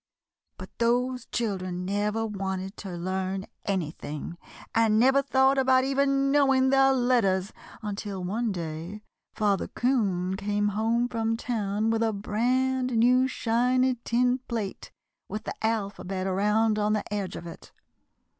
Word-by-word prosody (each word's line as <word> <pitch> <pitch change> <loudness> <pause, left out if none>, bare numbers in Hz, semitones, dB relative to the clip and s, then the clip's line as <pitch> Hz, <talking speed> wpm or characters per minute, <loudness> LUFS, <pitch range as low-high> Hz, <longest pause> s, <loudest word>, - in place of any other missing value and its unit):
] - - -57
"But - - -11
those 250 +1 +1
children 185 -5 -3
never 210 +3 -1
wanted 195 -1 -4
to 190 -3 -6
learn 190 +2 -2 0.2
anything, 165 -4 -4 0.4
and 225 -1 +3
never 265 +4 +5
thought 270 0 +3
about 260 -1 +4
even 275 0 +2
knowing 270 -2 +4
their 270 0 +5
letters, 235 -7 +2 0.3
until 205 -2 -4
one 220 +5 -1
day 170 +3 -6 0.3
Father 205 -2 +1
'Coon 195 -8 0
came 205 0 0
home 225 +4 +1
from 225 -1 -1
town 220 -2 -1
with 225 0 0
a 225 -1 +1
brand 250 +4 0
new 250 +3 +4
shiny 250 +1 +1
tin 245 +2 +2
plate 220 -5 -4 0.4
with 210 +2 -4
the - - -4
alphabet 200 -4 -2
around 210 +3 +2
on 210 0 +1
the 215 - 0
edge 200 -3 -3
of - - -7
it. 170 - -11
220 Hz, 135 wpm, -27 LUFS, 195-250 Hz, 0.4 s, never